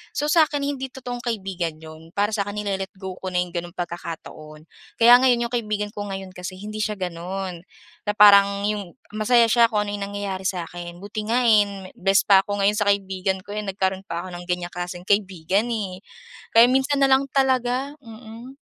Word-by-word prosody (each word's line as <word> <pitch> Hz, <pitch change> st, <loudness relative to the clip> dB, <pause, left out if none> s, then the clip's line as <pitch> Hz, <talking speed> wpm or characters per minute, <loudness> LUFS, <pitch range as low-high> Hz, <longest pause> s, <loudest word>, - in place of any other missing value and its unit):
So, 295 Hz, -, 0 dB
sa'kin 310 Hz, -3 st, +3 dB
hindi 270 Hz, -2 st, -3 dB
totoong 245 Hz, -2 st, -7 dB
kaibigan 190 Hz, -8 st, -3 dB
yon. 160 Hz, +1 st, -13 dB
Para 205 Hz, +1 st, +1 dB
sa'kin 205 Hz, 0 st, -3 dB
nile-let-go 190 Hz, -2 st, -4 dB
ko -, -, -3 dB
na 180 Hz, -, +1 dB
yong 180 Hz, -, -11 dB
gano'ng 175 Hz, +1 st, -5 dB
pagkakataon. 160 Hz, -3 st, -7 dB, 0.3 s
Kaya 235 Hz, +1 st, +8 dB
ngayon, 240 Hz, -2 st, +3 dB
yong 235 Hz, -, -18 dB
kaibigan 210 Hz, -3 st, -2 dB
ko 205 Hz, 0 st, -4 dB
ngayon 195 Hz, -1 st, -6 dB
kasi 180 Hz, +1 st, -6 dB
hindi 215 Hz, +1 st, -7 dB
siya 210 Hz, -1 st, -2 dB
gano'n. 180 Hz, 0 st, -5 dB, 0.4 s
Na -, -, +3 dB
parang 200 Hz, -1 st, +6 dB
yong, 205 Hz, -3 st, -4 dB, 0.2 s
masaya 230 Hz, +2 st, +4 dB
siya 235 Hz, +1 st, +5 dB
kung 210 Hz, -1 st, +1 dB
ano'yong 205 Hz, 0 st, -4 dB
nangyayari 200 Hz, -2 st, -4 dB
sa'kin. 175 Hz, -1 st, -5 dB
Buti 205 Hz, +2 st, -5 dB
nga 235 Hz, +3 st, +2 dB
eh, 200 Hz, -4 st, +2 dB
best 195 Hz, +1 st, +3 dB
pa 195 Hz, -1 st, +6 dB
ako 205 Hz, 0 st, -4 dB
ngayon 205 Hz, +1 st, +3 dB
sa 205 Hz, -, 0 dB
kaibigan 190 Hz, -1 st, -1 dB
ko 205 Hz, -, -9 dB
eh. 210 Hz, -, -2 dB
Nagkaroon 190 Hz, -1 st, -2 dB
pa 170 Hz, +1 st, -4 dB
ako 185 Hz, -, -8 dB
ng 175 Hz, -, -10 dB
ganyang 180 Hz, -1 st, -2 dB
klaseng 175 Hz, 0 st, -6 dB
kaibigan 195 Hz, +1 st, +1 dB
eh. 195 Hz, -5 st, -3 dB, 0.5 s
Kaya 230 Hz, +1 st, +8 dB
minsan 270 Hz, +2 st, +2 dB
na 275 Hz, -, +5 dB
lang 265 Hz, +1 st, +4 dB
talaga, 260 Hz, 0 st, +1 dB
mm. 230 Hz, +2 st, -12 dB
200 Hz, 185 wpm, -23 LUFS, 185-230 Hz, 0.5 s, Kaya